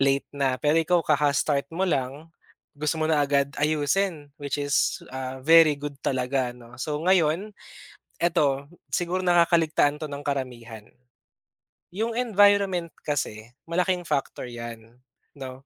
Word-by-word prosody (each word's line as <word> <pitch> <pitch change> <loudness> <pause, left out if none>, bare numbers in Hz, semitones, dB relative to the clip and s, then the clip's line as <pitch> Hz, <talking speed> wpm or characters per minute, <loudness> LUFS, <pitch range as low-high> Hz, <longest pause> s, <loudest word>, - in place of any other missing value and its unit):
late 140 0 +2
na. 140 -2 0
Pero 150 +4 +1
ikaw 175 +2 +2
kaka-start 145 -1 +1
mo 175 +4 -1
lang, 145 -1 -2 0.4
gusto 150 +2 -2
mo 155 - 0
na 155 -2 +2
agad 140 -1 +1
ayusin, 150 +1 0
which 140 0 -2
is, 145 -1 0
ah, 130 0 -5
very 160 -1 +7
good 145 0 -6
talaga, 125 -1 -1
no. 120 -1 -15
So 150 +2 -2
ngayon, 185 +2 +2 0.7
eto, 145 -5 +1 0.3
siguro 180 +1 -1
nakakaligtaan 165 -4 +3
'to 155 - -4
ng 145 0 -7
karamihan. 120 -6 -5 1.0
Yung 220 +5 -2
environment 200 -7 +3
kasi 115 -7 -3 0.2
malaking 180 +1 0
factor 145 -4 -2
yan, 115 -1 -9 0.4
'no. 135 -1 -9
145 Hz, 130 wpm, -25 LUFS, 135-170 Hz, 1.0 s, very